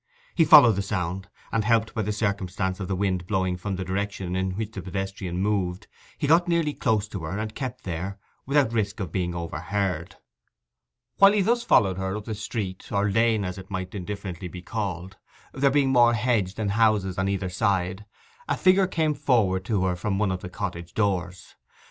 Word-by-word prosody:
He 165 - +4
followed 145 - +8
the - - +1
sound, 95 -2 -3 0.2
and, 110 - +1
helped 110 0 +2
by 110 - -1
the 105 0 -1
circumstance 100 -2 -2
of 95 - -4
the 95 - -1
wind 95 -2 -1
blowing 95 -3 0
from 95 +2 -4
the 95 0 -4
direction 95 -1 -3
in 95 0 0
which 110 -1 -3
the 100 - -6
pedestrian 95 -1 -4
moved, 95 -2 -1 0.3
he 150 - -2
got 165 +4 +4
nearly 170 -3 +1
close 110 -6 0
to 100 - -5
her, 80 +5 -4
and 110 0 -4
kept 125 -1 -5
there, 95 +3 -4 0.3
without 140 -4 +2
risk 105 -1 -1
of 95 -6 -4
being 90 -1 -2
overheard. 85 +1 -3 1.0
While 200 +1 +7
he 210 - +3
thus 235 +5 +2
followed 95 - +3
her 95 +2 -2
up 105 - -8
the 110 - -4
street 105 -3 -5
or 100 0 +1
lane, 110 -1 +2
as 90 +1 -5
it 95 - -11
might 95 -2 -4
indifferently 95 -2 -5
be 90 +1 -9
called, 95 -4 -4 0.4
there 140 +1 +3
being 135 -1 +2
more 120 -2 +5
hedge 105 -5 0
than 110 -2 -2
houses 105 -3 +2
on 95 +1 +1
either 95 -2 -2
side, 95 0 0 0.4
a - - 0
figure 185 0 +4
came 160 -4 +1
forward 115 -10 +1
to 100 -3 0
her 90 -1 0
from 95 +2 -2
one 100 -2 +1
of 90 -1 -3
the 90 - -7
cottage 85 -3 -5
doors. 90 -4 -1
100 Hz, 195 wpm, -25 LUFS, 95-110 Hz, 1.0 s, followed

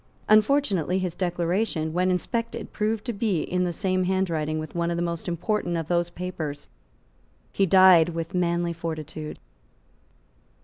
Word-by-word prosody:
Unfortunately 215 - +3
his 185 -3 -2
declaration, 175 -2 -1
when 180 +2 +1
inspected, 230 +6 -2
proved 215 0 -1
to 240 - -2
be 200 -5 0
in 180 0 -1
the 175 - -1
same 185 +1 0
handwriting 165 -5 0
with 155 -1 -6
one 170 0 -1
of 170 - -1
the 170 - 0
most 170 -1 -4
important 175 +1 -1
of 165 -2 -3
those 175 -1 +1
papers. 170 -5 -5 0.8
He 195 - +1
died 185 -2 +7
with 165 -1 -5
manly 170 -1 0
fortitude. 155 -2 -6
175 Hz, 145 wpm, -25 LUFS, 165-190 Hz, 0.8 s, died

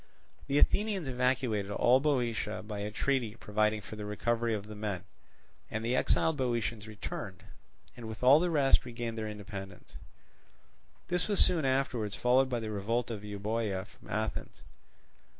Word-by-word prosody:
The 140 - +1
Athenians 200 0 +2
evacuated 125 -5 0
all 120 +5 +4
Boeotia 120 -7 0
by 105 -1 -5
a 105 +1 -2
treaty 115 0 0
providing 105 -1 0
for 110 - -9
the 105 - -5
recovery 115 +2 0
of 100 -1 -5
the 105 - -9
men; 105 -3 -3 0.7
and 110 +1 -3
the 120 +2 +1
exiled 160 +4 +2
Boeotians 115 -4 -1
returned, 105 -2 -6 0.5
and 120 -2 -8
with 110 +2 -7
all 135 +4 +8
the 175 +1 +1
rest 145 -5 +4
regained 120 -2 -5
their 110 -1 -3
independence. 100 -3 -8 1.1
This 180 0 0
was 205 -2 +2
soon 165 -5 +5
afterwards 130 -6 0
followed 130 +2 +3
by 120 -2 -1
the 110 -1 -4
revolt 115 +4 -1
of 105 -2 -5
Euboea 105 -1 -2
from - - -18
Athens. - - -3
115 Hz, 155 wpm, -31 LUFS, 105-130 Hz, 1.1 s, all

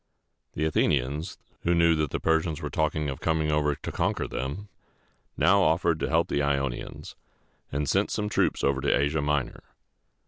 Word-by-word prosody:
The 80 - -1
Athenians, 75 +1 0 0.2
who 85 +1 +1
knew 85 0 +4
that 75 -2 0
the - - -3
Persians 80 -1 +1
were 75 -3 -5
talking 75 -1 0
of 65 -2 -4
coming 80 -1 0
over 75 -1 +1
to - - -6
conquer - - -1
them, 70 +11 -5 0.7
now 100 +1 +4
offered 80 -1 +2
to - - -1
help 85 +1 +2
the 70 - 0
Ionians, 70 -3 -3 0.6
and 70 +1 -2
sent - - +1
some 105 - -2
troops 105 - 0
over 70 0 +1
to - - +2
Asia 75 +2 +1
Minor. 75 -2 -1
75 Hz, 170 wpm, -27 LUFS, 70-80 Hz, 0.7 s, knew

